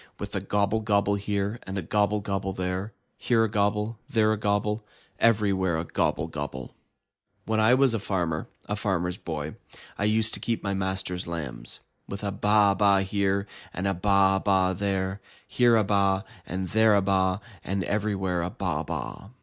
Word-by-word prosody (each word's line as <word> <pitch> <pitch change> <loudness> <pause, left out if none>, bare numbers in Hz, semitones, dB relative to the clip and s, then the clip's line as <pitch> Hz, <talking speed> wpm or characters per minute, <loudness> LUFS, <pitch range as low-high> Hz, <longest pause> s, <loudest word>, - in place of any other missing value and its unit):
With - - -6
a - - -1
gobble 105 +2 +1
gobble 100 -2 +2
here, 100 +2 -2
and 95 +1 -6
a 95 - -2
gobble 105 +4 +1
gobble 100 -1 -2
there, 90 +3 -3 0.3
Here 115 -2 +3
a - - +2
gobble, 105 +1 0
there 110 -5 +3
a - - +1
gobble. 105 +1 0 0.4
Everywhere 100 -6 +2
a 80 - -2
gobble 80 -2 0
gobble! 70 -5 -6 0.7
When 110 0 0
I 110 +3 +5
was 135 -2 +4
a 115 - 0
farmer, 85 -6 -2 0.2
a 105 - -2
Farmer's 95 -4 -1
Boy, 80 -4 -5 0.5
I 100 - +1
used 110 +1 +3
to - - -4
keep 115 -1 -2
my 100 -1 -1
master's 95 -2 -2
lambs, 70 -8 -5 0.3
With 100 +1 -6
a 100 - -1
baa 105 0 +4
baa 100 0 +4
here, 100 0 0 0.3
and 90 - -3
a 100 - +2
baa 95 +1 +3
baa 95 -2 +2
there. 95 0 -2 0.3
Here 120 -1 +4
a 110 - +4
baa, 100 -1 +2 0.2
and 95 0 -3
there 110 -1 +4
a 100 - +4
baa. 95 -1 +2 0.3
And 95 0 -2
everywhere 95 -3 -1
a 85 - -2
baa - - -2
baa! - - -5
100 Hz, 175 wpm, -27 LUFS, 95-105 Hz, 0.7 s, I